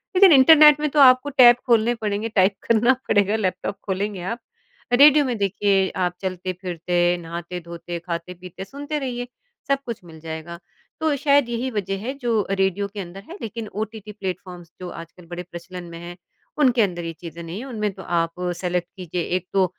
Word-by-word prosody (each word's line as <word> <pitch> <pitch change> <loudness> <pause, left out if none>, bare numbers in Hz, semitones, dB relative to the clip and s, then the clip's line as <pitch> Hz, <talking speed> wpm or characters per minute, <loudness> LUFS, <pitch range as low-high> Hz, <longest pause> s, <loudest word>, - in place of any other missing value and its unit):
लेक़िन 375 0 +7
इंटरनेट 300 +2 +8
में 300 0 0
तो 295 - 0
आपको 255 +1 +6
टेब 250 -4 +7
खोलने 235 0 +3
पड़ेंगे 215 0 -2
टाइप 195 -2 +3
करना 230 +3 +4
पड़ेगा 205 +1 +3
लैपटॉप 195 -1 -2
खोलेंगे 195 0 -2
आप। 230 +7 -4 0.5
रेडियो 290 +3 +7
में 245 -3 -2
देखिए 195 -1 +1 0.2
आप 180 0 -3
चलते-फ़िरते, 180 -1 -1
नहाते-धोते, 170 0 -7
खाते-पीते 180 +2 -7
सुनते 285 +6 -5
रहिए, 245 -3 -4 0.4
सब 275 0 +2
कुछ 235 -6 -6
मिल 160 -2 -13
जाएगा। 160 +1 -7 0.4
तो 315 -2 +2
शायद 280 -3 +3
यही 240 +2 -2
वजह 195 -3 -3
है 265 - -2
जो 230 -5 0
रेडियो 195 +1 0
के 210 - -6
अंदर 190 +2 -9
है 345 - -7
लेक़िन 225 0 -5
ओटीटी 215 +1 -6
प्लेटफॉर्म्स 185 -4 -7
जो 180 - -5
आजकल 170 +1 -11
बड़े 175 +1 -6
प्रचलन 175 +1 -8
में 165 - -8
हैं, 175 +1 -9 0.4
उनके 255 -5 +4
अंदर 175 -4 -1
ये 165 - -3
चीज़ें 170 -1 -8
नहीं 165 +4 -6
हैं। 255 - -7
उनमें 215 -5 -2
तो - - -10
आप 165 -1 0 0.3
सेलेक्ट 180 -1 -1
कीजिए 180 -1 -4 0.2
एक 185 0 -9
तो 195 -1 +4
195 Hz, 180 wpm, -22 LUFS, 175-240 Hz, 0.5 s, इंटरनेट